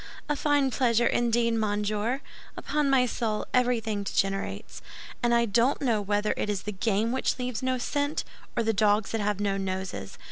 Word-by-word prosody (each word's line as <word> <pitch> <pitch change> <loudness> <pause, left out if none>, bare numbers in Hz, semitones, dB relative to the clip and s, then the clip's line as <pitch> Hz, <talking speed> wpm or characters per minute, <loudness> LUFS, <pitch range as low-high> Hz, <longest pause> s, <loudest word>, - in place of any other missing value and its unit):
"A 295 - 0
fine 290 -2 +2
pleasure, 235 -2 +2
indeed, 235 -1 +2
monsieur! 215 +3 0 0.4
Upon 295 0 0
my 265 -2 +4
soul, 225 -3 -2
everything 235 -4 +1
degenerates; 195 0 -2 0.4
and 240 - +2
I 235 0 +4
don't 235 +5 +2
know 235 -7 +1
whether 205 +1 0
it - - -2
is 200 -3 -2
the 210 - -3
game 210 +3 0
which 260 0 0
leaves 250 -3 -3
no 260 0 0
scent, 285 +4 -1 0.3
or 235 - +2
the 225 0 +1
dogs 210 0 +2
that 225 - -1
have 205 -1 0
no 200 -1 0
noses. 185 - -4
225 Hz, 175 wpm, -27 LUFS, 205-250 Hz, 0.4 s, my